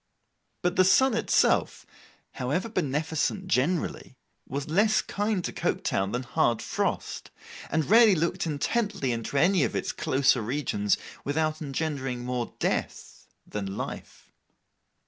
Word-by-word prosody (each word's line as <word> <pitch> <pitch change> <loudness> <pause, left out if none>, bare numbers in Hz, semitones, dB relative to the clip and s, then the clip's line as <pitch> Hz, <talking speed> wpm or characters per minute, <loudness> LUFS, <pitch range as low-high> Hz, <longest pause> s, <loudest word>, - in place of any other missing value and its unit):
But 180 0 0
the 185 - +7
sun 250 +8 +4
itself, 230 - +2 0.5
however 140 - -2
beneficent, 160 +1 -1
generally, 160 -4 -1 0.3
was 140 +3 -3
less 210 +7 +3
kind 205 -3 -1
to - - -4
Coketown 95 +1 -1
than 125 +2 -2
hard 120 -1 +1
frost, - - -3 0.4
and 160 -3 0
rarely 225 -1 +7
looked 170 +1 -1
intently 160 - -1
into 115 +4 -3
any 175 +2 +4
of - - -1
its - - -1
closer 130 -2 +2
regions 110 -4 0 0.3
without 155 +2 -1
engendering 135 -4 -3
more 125 -1 -3
death - - -3 0.2
than 100 -2 -5
life. - - -7
150 Hz, 125 wpm, -27 LUFS, 130-185 Hz, 0.5 s, the